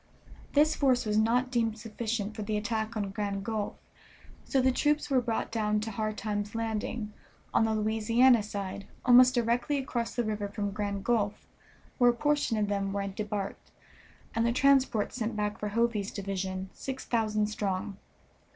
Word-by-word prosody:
This 300 +2 +4
force 260 -4 +2
was 210 -1 0
not 240 +4 +2
deemed 225 -3 0
sufficient 220 -1 -3
for 220 - -5
the 210 0 -1
attack 220 +1 -2
on 200 -2 -2
Grand 200 -1 -3
Gulf, 215 -2 -2 0.7
so 270 - +1
the 260 0 +4
troops 295 +2 +1
were 260 -2 +4
brought 230 -2 -2
down 210 -2 +1
to 220 +1 -4
Hard 215 0 -2
Times 205 0 -3
landing, 220 -1 -3 0.4
on 225 - +4
the 220 0 +1
Louisiana 225 +3 +4
side, 200 -1 -5 0.2
almost 250 +1 +7
directly 240 +5 +1
across 245 -4 -3
the 240 - +1
river 210 -2 -2
from 205 0 -3
Grand 200 -1 -3
Gulf, 215 -4 0 0.5
where 245 -1 +6
a 240 - +2
portion 290 -4 +1
of 210 -1 +1
them 200 -1 -1
were 200 0 -1
debarked, 205 0 -4 0.6
and 230 - +1
the 235 - +2
transports 260 -4 +3
sent 225 -1 -2
back 210 0 -2
for 210 - -2
Hovey's 220 -1 0
division, 190 -1 -4
six 265 -1 -6
thousand 215 -3 +1
strong. 200 -2 -3
220 Hz, 170 wpm, -29 LUFS, 205-240 Hz, 0.7 s, almost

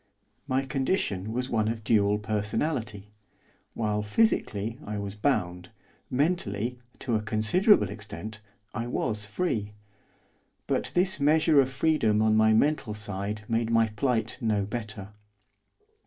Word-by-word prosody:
My 135 0 0
condition 130 - -1
was 125 +3 -2
one 110 -2 +1
of 110 0 -3
dual 105 -1 +3
personality, 105 0 -2 0.6
while, 105 -2 0
physically, 110 - 0
I 105 0 -4
was 100 -1 -4
bound, 90 -6 -1 0.4
mentally, 125 - -1 0.2
to 125 - -2
a 105 - +1
considerable 110 - +3
extent, 105 +1 -7 0.3
I 115 +2 -3
was 105 -3 -1
free. 105 - -2 0.9
But - - -1
this 180 0 +2
measure 150 0 +5
of 130 - 0
freedom 135 -6 +2
on 110 0 +3
my 110 0 +5
mental 115 -1 +2
side 105 0 -4
made 115 0 0
my 115 -1 +3
plight 115 +2 -1
no 105 -3 +1
better. 110 -3 -6
110 Hz, 125 wpm, -27 LUFS, 105-130 Hz, 0.9 s, measure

